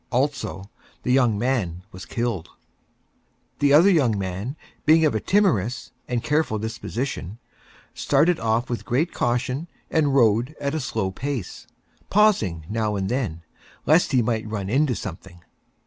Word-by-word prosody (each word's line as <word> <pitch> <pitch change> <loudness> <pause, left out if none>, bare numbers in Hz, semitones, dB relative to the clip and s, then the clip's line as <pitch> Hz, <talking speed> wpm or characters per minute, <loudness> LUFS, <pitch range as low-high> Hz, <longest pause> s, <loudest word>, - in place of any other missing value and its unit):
Also, 125 - -1 0.4
the 125 - 0
young 125 -5 +3
Man 100 -8 -1
was 95 +1 -10
killed. 115 -8 -2 1.1
The 145 -1 +3
Other 165 +7 +7
Young 130 - +3
Man, 95 +7 -4 0.3
being 160 +1 +5
of 150 - +2
a 110 - 0
Timorous 130 - +1 0.2
and 120 -1 -2
Careful 150 -7 +1
Disposition, 110 -2 -4 0.6
started 155 +5 +2
off 115 +2 0
with 120 - -4
great 150 +8 0
Caution 125 +6 -1 0.2
and 145 -4 +2
Rode 120 +3 +3
at 140 0 -2
a 160 - -1
Slow 110 -8 -2
Pace, 130 -1 -5 0.4
pausing 115 - +2
now 110 0 -1
and 95 -1 -2
then, 110 -10 -2 0.4
Lest 160 +2 +4
he 125 -3 +3
might 110 -1 -1
Run 100 -2 -3
into 135 0 +2
Something. 90 -4 -8
120 Hz, 145 wpm, -23 LUFS, 105-145 Hz, 1.1 s, Other